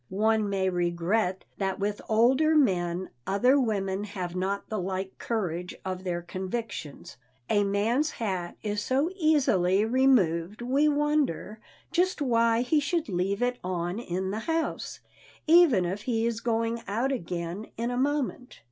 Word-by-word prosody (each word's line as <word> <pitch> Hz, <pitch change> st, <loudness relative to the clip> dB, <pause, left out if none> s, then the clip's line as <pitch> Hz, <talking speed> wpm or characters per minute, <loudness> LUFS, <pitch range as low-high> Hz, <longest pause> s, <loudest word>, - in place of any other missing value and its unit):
One 215 Hz, +1 st, +1 dB
may 195 Hz, -1 st, 0 dB
regret 180 Hz, +2 st, 0 dB
that 195 Hz, -1 st, -1 dB
with 205 Hz, +1 st, -2 dB
older 260 Hz, +8 st, +4 dB
men 185 Hz, -, +1 dB, 0.2 s
other 250 Hz, +8 st, +4 dB
women 200 Hz, -4 st, -1 dB
have 185 Hz, -4 st, -5 dB
not 195 Hz, +2 st, -2 dB
the 215 Hz, -, -3 dB
like 190 Hz, +1 st, -3 dB
courage 180 Hz, -6 st, -3 dB
of 185 Hz, 0 st, -4 dB
their 175 Hz, -2 st, -3 dB
convictions. 185 Hz, -, -6 dB, 0.3 s
A 205 Hz, -1 st, +4 dB
man's 220 Hz, +9 st, +1 dB
hat 185 Hz, -9 st, -4 dB
is 205 Hz, -1 st, -1 dB
so 275 Hz, +9 st, +1 dB
easily 220 Hz, -, +3 dB
removed 215 Hz, -8 st, +2 dB
we 275 Hz, +5 st, +2 dB
wonder 290 Hz, -, 0 dB, 0.3 s
just 360 Hz, +2 st, +1 dB
why 230 Hz, -4 st, +2 dB
he 295 Hz, +5 st, +2 dB
should 305 Hz, 0 st, -1 dB
leave 195 Hz, +4 st, 0 dB
it 245 Hz, 0 st, 0 dB
on 180 Hz, +2 st, -2 dB
in 190 Hz, -3 st, -3 dB
the 215 Hz, -, -2 dB
house, 325 Hz, +7 st, -2 dB, 0.4 s
even 315 Hz, -, +6 dB
if 190 Hz, +4 st, -3 dB
he 225 Hz, 0 st, 0 dB
is 230 Hz, -1 st, -1 dB
going 230 Hz, 0 st, -1 dB
out 235 Hz, +7 st, 0 dB
again 175 Hz, -3 st, -4 dB
in 235 Hz, +2 st, -1 dB
a -, -, -2 dB
moment. 275 Hz, 0 st, -2 dB
215 Hz, 150 wpm, -27 LUFS, 185-255 Hz, 0.4 s, even